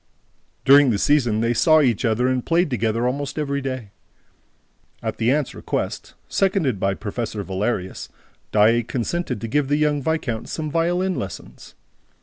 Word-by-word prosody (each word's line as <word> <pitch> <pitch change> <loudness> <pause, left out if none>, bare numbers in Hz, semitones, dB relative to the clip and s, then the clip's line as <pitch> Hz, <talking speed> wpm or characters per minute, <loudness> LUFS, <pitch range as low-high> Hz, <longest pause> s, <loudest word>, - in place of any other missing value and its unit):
During 140 0 +7
the 110 - +1
season, 120 -4 +2
they 115 +1 +1
saw 155 +6 +5
each 125 -5 +2
other 115 +2 +1
and 130 -1 0
played 170 -2 +1
together 115 -1 0
almost 140 +3 -2
every 140 -2 -1
day. 130 -6 -5 1.1
At - - -3
the 115 +2 +2
aunt's 145 -1 0
request, - - -4
seconded 185 - +1
by 95 0 0
Professor 110 0 -4
Valerius, 95 0 -3 0.4
Daae 110 +3 +4
consented 125 +2 -3
to 115 - -3
give 145 +4 0
the 145 +1 +1
young 150 -1 +1
viscount 135 -7 -2
some 155 -2 -4
violin 175 +3 +1
lessons. 95 - -8
130 Hz, 150 wpm, -22 LUFS, 115-150 Hz, 1.1 s, During